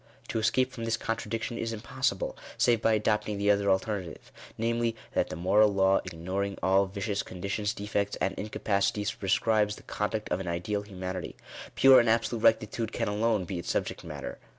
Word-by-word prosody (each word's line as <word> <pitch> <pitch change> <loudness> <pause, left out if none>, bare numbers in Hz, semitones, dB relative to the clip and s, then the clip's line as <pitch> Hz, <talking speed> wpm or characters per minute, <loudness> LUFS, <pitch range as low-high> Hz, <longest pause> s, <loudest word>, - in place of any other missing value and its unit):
To 115 - -1
escape 130 +4 +2
from 120 -2 -7
this 115 0 0
contradiction 115 +1 -3
is 115 0 -2
impossible, 125 -1 -2 0.2
save 120 -2 +3
by 115 - +3
adopting 105 -1 0
the 100 +1 +3
other 100 0 +2
alternative; 95 -2 -2 0.3
namely, 115 0 0 0.2
that - - +1
the - - -5
moral 100 +5 +4
law 95 0 +3
ignoring 95 +3 -3
all 95 +1 +4
vicious 100 +1 -2
conditions, 100 +3 -3
defects, 100 -1 -2
and 95 - 0
incapacities, 105 0 -1
prescribes 105 +2 +1
the - - -14
con 105 - -2
duct 110 -1 -4
of 90 - 0
an 95 - -5
ideal 90 +5 -2
humanity. 95 -3 -6 0.4
Pure 135 -1 +8
and 120 -1 +3
absolute 115 0 +1
rectitude 110 +1 +2
can - - -2
alone 105 -2 +1
be 90 0 -4
its 85 - -6
subject - - -2
matter. 60 - -7
105 Hz, 175 wpm, -29 LUFS, 95-115 Hz, 0.4 s, Pure